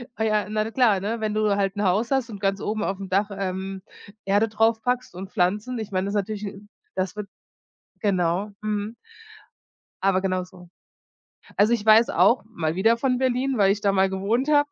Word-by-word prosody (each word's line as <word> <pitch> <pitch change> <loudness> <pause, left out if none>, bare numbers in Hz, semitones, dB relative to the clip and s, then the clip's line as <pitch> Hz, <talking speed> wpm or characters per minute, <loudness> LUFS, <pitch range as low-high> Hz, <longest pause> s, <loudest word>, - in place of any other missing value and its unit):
Ah, 220 - -2
ja, 215 -1 +1
na 215 +1 -1
klar, 230 -6 +3
ne, 215 +4 -3
wenn 215 -1 -1
du 215 -1 +2
halt 195 0 0
'n 205 - -1
Haus 205 +6 +1
hast 265 -3 +1
und 205 -3 -8
ganz 195 -1 -1
oben 215 0 -2
auf 195 - -2
dem 195 -1 -7
Dach, 200 +3 +1
ähm, 190 0 -4 0.4
Erde 205 +3 +3
draufpackst 225 +1 0
und 190 +2 -7
Pflanzen, 210 +6 0
ich 215 -2 -6
meine, 185 0 0
das 200 - -3
ist - - -2
natürlich 205 +1 -3
'n 200 +1 -9 0.3
Das 185 0 -2
wird 210 -1 -5 0.7
Genau. 190 0 0
Mhm. 215 +1 -3 1.1
Aber 190 -1 +2
genau 185 -1 -1
so. 180 -1 -15 0.9
Also, 210 +3 +4
ich 220 -2 -1
weiß 220 +2 +6
auch- 240 - +3
mal 160 -1 -1
wieder 225 +5 +3
von 250 0 +1
Berlin, 260 +1 0
weil 195 -2 +4
ich 205 +1 -2
da 200 - +2
mal 190 0 +2
gewohnt 210 +9 -1
habe- 290 -1 +4
205 Hz, 200 wpm, -24 LUFS, 195-225 Hz, 1.1 s, weiß